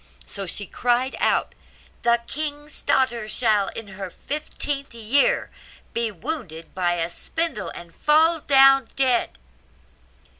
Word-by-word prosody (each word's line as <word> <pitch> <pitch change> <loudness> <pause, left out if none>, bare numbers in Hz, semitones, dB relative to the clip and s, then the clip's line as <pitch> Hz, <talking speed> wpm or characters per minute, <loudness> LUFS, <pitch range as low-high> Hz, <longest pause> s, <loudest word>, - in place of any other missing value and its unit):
So 200 -2 -5
she 205 +4 -3
cried 245 +6 0
out, - - +1 0.5
'The 235 0 +3
king's 295 +1 -5
daughter 240 -5 +1
shall, 215 -4 +2
in 225 -3 -7
her 190 -1 -6
fifteenth 280 - -5
year, 235 +5 +2 0.4
be 230 -1 0
wounded 195 - -6
by 175 -2 +1
a 165 -1 -1
spindle, 285 - -3
and 170 -1 -10
fall 320 +2 +4
down 270 -3 +5
dead. 255 - +1
240 Hz, 120 wpm, -23 LUFS, 200-280 Hz, 0.5 s, down